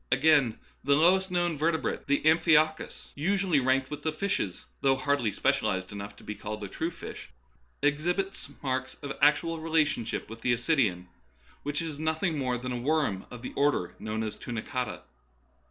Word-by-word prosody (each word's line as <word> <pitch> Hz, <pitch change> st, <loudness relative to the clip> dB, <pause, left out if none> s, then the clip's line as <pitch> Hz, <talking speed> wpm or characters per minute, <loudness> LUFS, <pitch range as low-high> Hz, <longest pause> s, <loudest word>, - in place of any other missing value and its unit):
Again, 135 Hz, -3 st, +4 dB, 0.3 s
the 140 Hz, +1 st, +4 dB
lowest 185 Hz, +5 st, +4 dB
known 175 Hz, -4 st, 0 dB
vertebrate, 160 Hz, +1 st, 0 dB
the 140 Hz, -, +2 dB
amphioxus, 155 Hz, -1 st, +3 dB
usually 185 Hz, 0 st, +2 dB
ranked 130 Hz, +1 st, +1 dB
with 150 Hz, -, -5 dB
fishes, 200 Hz, -, -2 dB, 0.2 s
though 135 Hz, -1 st, +4 dB
hardly 135 Hz, -4 st, +1 dB
specialized 95 Hz, -1 st, 0 dB
enough 100 Hz, 0 st, -7 dB
to -, -, -16 dB
be 105 Hz, -, -4 dB
called 105 Hz, 0 st, -6 dB
a -, -, -3 dB
true 160 Hz, -, -2 dB
fish, -, -, -9 dB, 0.5 s
exhibits 175 Hz, +5 st, 0 dB
marks 130 Hz, -1 st, -2 dB
of 140 Hz, -1 st, -4 dB
actual 160 Hz, +3 st, +3 dB
relationship 155 Hz, -7 st, 0 dB
with 115 Hz, +1 st, -10 dB
the 125 Hz, -, +2 dB
ascidian, 120 Hz, -, +1 dB, 0.6 s
which 145 Hz, +3 st, -2 dB
is 155 Hz, -3 st, -5 dB
nothing 160 Hz, +2 st, 0 dB
more 130 Hz, -4 st, 0 dB
than 125 Hz, +1 st, -5 dB
a 120 Hz, -1 st, -3 dB
worm 140 Hz, -9 st, 0 dB
of 125 Hz, 0 st, -10 dB
the -, -, -6 dB
order 140 Hz, -11 st, +1 dB
known 110 Hz, +1 st, -2 dB
as 110 Hz, -, -3 dB
tunicata. 125 Hz, +2 st, -4 dB
140 Hz, 160 wpm, -29 LUFS, 120-160 Hz, 0.6 s, Again